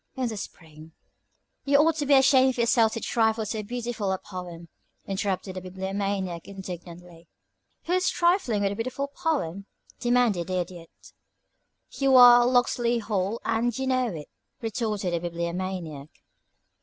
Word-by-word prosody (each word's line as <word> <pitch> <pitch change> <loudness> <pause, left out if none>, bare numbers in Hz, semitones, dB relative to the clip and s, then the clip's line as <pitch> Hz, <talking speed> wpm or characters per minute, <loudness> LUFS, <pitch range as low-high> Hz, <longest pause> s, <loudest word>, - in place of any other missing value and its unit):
In 260 -2 -1
the 220 - -5
spring 160 -4 -11 0.4
" - - -49
"You 280 0 +4
ought 315 +2 +4
to 290 -3 -2
be 280 - +6
ashamed 265 -1 +5
of 255 - -3
yourself 230 -1 +3
to - - -3
trifle 220 -1 +1
with 210 - -6
so 220 0 -2
beautiful 230 -2 -3
a 190 - 0
poem," 180 -3 -9 0.4
interrupted 195 -1 -3
the 185 - -5
Bibliomaniac, 190 -1 -4
indignantly. 175 -3 -10 0.6
"Who's 365 +2 +1
trifling 345 - +1
with 195 - +1
a - - -4
beautiful 255 +5 -3
poem?" 205 - -2 0.3
demanded 240 -8 +1
the 185 0 -2
Idiot. 175 -1 -9 0.8
"You 270 -1 +2
are 245 -1 +8
'Locksley 245 -1 +2
Hall' 210 -1 -2
and 230 +1 0
you 265 - -2
know 255 -1 +1
it," 160 -9 -7 0.3
retorted 215 -5 -2
the 170 - 0
Bibliomaniac. 170 -3 -4
210 Hz, 150 wpm, -26 LUFS, 180-245 Hz, 0.8 s, are